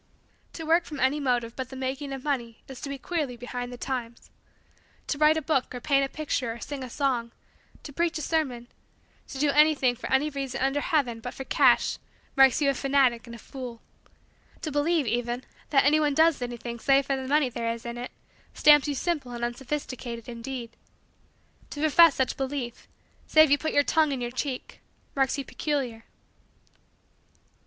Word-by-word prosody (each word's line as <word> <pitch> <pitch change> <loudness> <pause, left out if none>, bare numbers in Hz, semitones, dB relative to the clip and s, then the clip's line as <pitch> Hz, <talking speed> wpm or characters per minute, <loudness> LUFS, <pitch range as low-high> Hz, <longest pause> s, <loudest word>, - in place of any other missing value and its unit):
To 325 - -6
work 330 +2 +3
from 295 -3 -7
any 270 +3 +2
motive 245 -4 0
but 260 -1 -5
the 265 - -9
making 265 +2 -4
of 270 -1 -6
money 240 -6 -3
is 265 -2 -10
to 285 - -5
be 280 - -4
queerly 285 -4 -3
behind 245 0 -5
the 245 - -8
times. 240 -3 -5 0.7
To 290 - -3
write 305 +1 +5
a 315 - -2
book 270 -4 0
or - - -4
paint 275 +1 +2
a 270 - -1
picture 275 -6 -2
or 235 - -10
sing 275 +2 -6
a 255 - -7
song, 245 -3 -1 0.5
to 285 - -9
preach 335 +2 0
a 310 - -4
sermon, 265 -8 -1 0.6
to - - -8
do 285 +1 +2
anything 295 -4 +4
for - - -7
any 280 +3 +2
reason 275 -2 -4
under 270 +2 +1
heaven 275 -10 0
but 245 +2 -7
for 270 - -5
cash - - +3 0.4
marks 270 +1 +5
you 280 - +4
a - - -2
fanatic 265 -3 +2
and 235 - -8
a - - -9
fool. 245 0 -8 0.8
To 310 - -3
believe, 295 +1 +1
even, 240 +2 -2 0.3
that 275 -2 +4
anyone 295 0 +3
does 320 -3 +4
anything 240 -1 -5
save 275 +2 +3
for 275 - 0
the 265 -1 -5
money 290 -1 +3
there 230 -1 -2
is 230 0 -7
in 235 0 -5
it 245 - -5 0.5
stamps 295 -1 +6
you 290 - -1
simple 290 -5 -2
and 240 0 -2
unsophisticated, 240 -2 -5
indeed. 235 0 -6 1.0
To 290 - -7
profess 315 +1 +6
such 260 - 0
belief, 265 -3 -4 0.4
save 310 -2 +6
you 285 - +5
put 315 - -2
your 285 - +4
tongue 310 0 +2
in 270 - -2
your 240 0 -3
cheek, 255 0 -5 0.3
marks 270 0 +1
you 275 - -4
peculiar. 255 -7 -3
270 Hz, 190 wpm, -27 LUFS, 245-295 Hz, 1.0 s, stamps